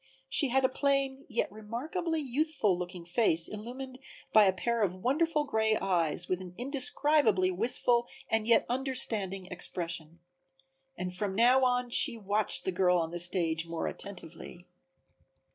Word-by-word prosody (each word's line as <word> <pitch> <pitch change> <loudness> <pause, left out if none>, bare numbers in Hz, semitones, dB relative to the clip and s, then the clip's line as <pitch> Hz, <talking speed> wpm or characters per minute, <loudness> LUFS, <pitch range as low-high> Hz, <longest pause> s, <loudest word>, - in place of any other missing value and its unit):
She 290 - +5
had 265 +1 +2
a - - +6
plain, 275 0 -1
yet 235 -5 -1
remarkably 295 - -4
youthful 270 - 0
looking 180 -1 -7
face 170 -3 +2
illumined 255 +5 -8 0.3
by 215 -1 +7
a 190 - +4
pair 230 +5 -2
of 185 -3 0
wonderful 300 - 0
gray 220 -6 +1
eyes 175 -2 0
with 185 0 -2
an 180 -1 -10
indescribably 260 -6 +2
wistful 235 +4 +1 0.2
and 225 0 0
yet 235 - +4
understanding 225 -7 -1
expression. 170 -2 -2 0.8
And 180 0 -5
from 190 0 -3
now 250 +4 +4
on 250 -1 +1
she 235 - +3
watched 210 0 0
the 190 - 0
girl 180 -1 +2
on 165 -1 -2
the 175 - -4
stage 170 -2 0
more 165 -1 -4
attentively. 175 -2 -6
215 Hz, 145 wpm, -30 LUFS, 180-260 Hz, 0.8 s, by